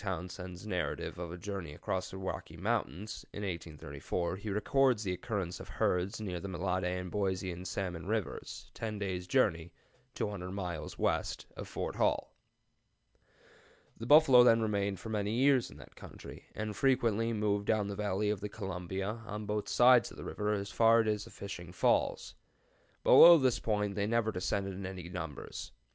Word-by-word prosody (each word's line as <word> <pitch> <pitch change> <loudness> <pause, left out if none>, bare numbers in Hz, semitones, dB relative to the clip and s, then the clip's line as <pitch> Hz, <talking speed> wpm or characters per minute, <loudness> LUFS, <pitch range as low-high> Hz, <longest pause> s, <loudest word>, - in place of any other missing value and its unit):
Townsend's 90 0 -5
"Narrative 90 -3 -3
of 85 -2 -5
a 90 - -6
Journey 90 -5 -6
across 95 +3 -3
the 95 - -8
Rocky 95 -2 -5
Mountains," 90 - -2
in 105 - -6
1834, 85 0 -4
he 105 +2 -6
records 120 +3 +2
the 95 -3 -1
occurrence 95 -4 -3
of - - -10
herds 90 +4 0
near 95 -5 -4
the 100 - -6
Mellade 95 0 -1
and 90 -1 -5
Boise 95 -2 -1
and 90 +2 -7
Salmon 90 -3 -4
Rivers, 110 -2 -4
ten 110 -2 -4
days' 95 -3 -3
journey 85 -9 +2 0.4
200 95 -3 -3
miles 90 -4 -5
west - - -1
of - - -7
Fort - - -4
Hall.] - - +1 1.6
The 115 - -7
buffalo 140 -4 +8
then 115 -2 +6
remained 100 -2 0
for 115 - -8
many 105 -1 -1
years 130 +1 +3
in - - -13
that - - -14
country, - - -11
and 110 -1 -4
frequently 115 -4 +2
moved 105 -2 0
down 110 -2 +2
the 100 - -4
valley 105 0 0
of 105 - -3
the 105 - -4
Columbia, 95 +2 -4
on 105 -1 -5
both 105 0 -2
sides 125 -1 +6
of - - -13
the - - -8
river, 105 0 -1
as 100 -1 -3
far 115 +2 +5
as 105 -2 -1
the - - -12
Fishing 90 -4 -8
Falls. 90 - +1 0.7
Below 170 0 +10
this 130 -5 +2
point 105 -2 0
they 100 +1 -1
never 115 -1 +1
descended 95 +1 -2
in 95 +1 -5
any 90 -2 -7
numbers. 85 -5 -6
100 Hz, 170 wpm, -32 LUFS, 90-110 Hz, 1.6 s, Below